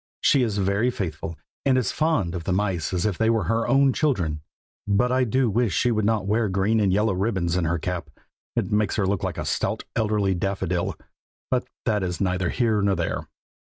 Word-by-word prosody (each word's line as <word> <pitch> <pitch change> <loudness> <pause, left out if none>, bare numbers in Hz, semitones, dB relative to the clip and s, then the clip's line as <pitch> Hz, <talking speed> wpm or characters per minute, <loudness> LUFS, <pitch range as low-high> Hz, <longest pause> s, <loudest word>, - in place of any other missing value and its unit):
She 140 - +4
is 110 -4 0
very 100 +5 +1
faithful, 85 -7 -4 0.3
and 130 -2 +3
as 125 -6 +1
fond 155 - 0
of 85 -3 -5
the - - -1
mice 95 -4 0
as 90 0 -1
if 105 -4 -1
they 110 0 +3
were 115 -3 +2
her 115 +6 0
own 135 +1 +4
children; 85 - 0 0.5
but 105 +5 +2
I 130 0 +3
do 130 +3 +2
wish 110 -4 +1
she 125 - +2
would 110 -2 +1
not 105 -3 +1
wear 110 +1 +1
green 100 +4 +1
and 100 -3 +2
yellow 105 +2 +2
ribbons 95 -3 0
in 90 -2 +1
her 85 +2 +1
cap. 85 -2 -4 0.5
It - - -1
makes 105 -1 +1
her 100 - +1
look 95 -1 0
so - - 0
like - - -5
a - - -3
stout - - -1
elderly 105 -3 +1
daffodil, 90 -1 -2 0.5
but 125 -1 +1 0.2
that 105 -3 +1
is 90 -1 -2
neither 90 -2 0
here 110 -4 +1
nor 100 -1 +2
there. - - -2
100 Hz, 215 wpm, -24 LUFS, 90-115 Hz, 0.5 s, She